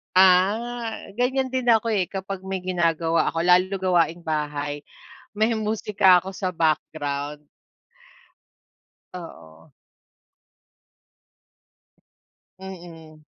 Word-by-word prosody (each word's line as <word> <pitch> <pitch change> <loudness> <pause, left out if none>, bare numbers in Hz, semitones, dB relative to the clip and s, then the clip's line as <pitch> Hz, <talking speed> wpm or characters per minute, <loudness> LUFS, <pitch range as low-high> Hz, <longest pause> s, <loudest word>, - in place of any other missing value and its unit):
Ah, 215 +5 +2
ganyan 260 +1 +1
din 255 -1 -2
ako, 230 -1 +4
eh, 195 -4 +1
kapag 195 0 -5
may 190 -1 -4
ginagawa 165 -2 +1
ako 165 - -1
lalo 180 +2 +4
gawaing-bahay, 160 -5 -1 0.6
may 220 +2 +2
musika 210 -3 +3
ako 190 +2 -6
sa 185 -1 -2
background. 150 -3 -2 1.7
Oo. 165 - -11 2.9
Mm. 170 -5 -11
185 Hz, 80 wpm, -24 LUFS, 160-205 Hz, 2.9 s, ako